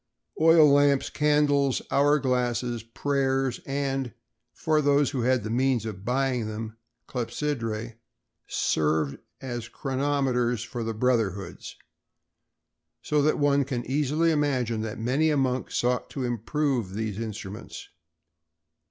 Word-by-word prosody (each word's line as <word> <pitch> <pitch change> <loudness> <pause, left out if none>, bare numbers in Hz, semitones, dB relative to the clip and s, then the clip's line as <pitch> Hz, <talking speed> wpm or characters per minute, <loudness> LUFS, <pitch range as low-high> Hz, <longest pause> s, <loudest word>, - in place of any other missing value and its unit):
Oil 160 -1 +7
lamps, 140 -1 +3
candles, 145 -2 +2
hour 145 +2 +4
glasses, 125 -3 -1
prayers 135 +2 -1
and—for 135 +1 -2
those 145 -2 +3
who 130 - -2
had 125 -1 +2
the 110 - -4
means 125 -1 +1
of 100 -4 -6
buying 125 -1 0
them—clepsydræ 115 +1 -5 0.5
served 75 -2 0 0.2
as 120 -3 -5
chronometers 130 -4 0
for 120 0 -5
the 115 0 -3
brotherhoods; 105 -6 -1 1.3
so 150 -1 +1
that 150 +2 +2
one 145 -1 +3
can 125 -3 -4
easily 150 +5 +1
imagine 130 -7 0
that 110 -1 -4
many 130 +8 +1
a 150 - +2
monk 130 -2 0
sought 125 +1 0
to 135 - -4
improve 120 -3 -1
these 110 -2 -3
instruments. 110 -1 -7
125 Hz, 115 wpm, -26 LUFS, 115-140 Hz, 1.3 s, Oil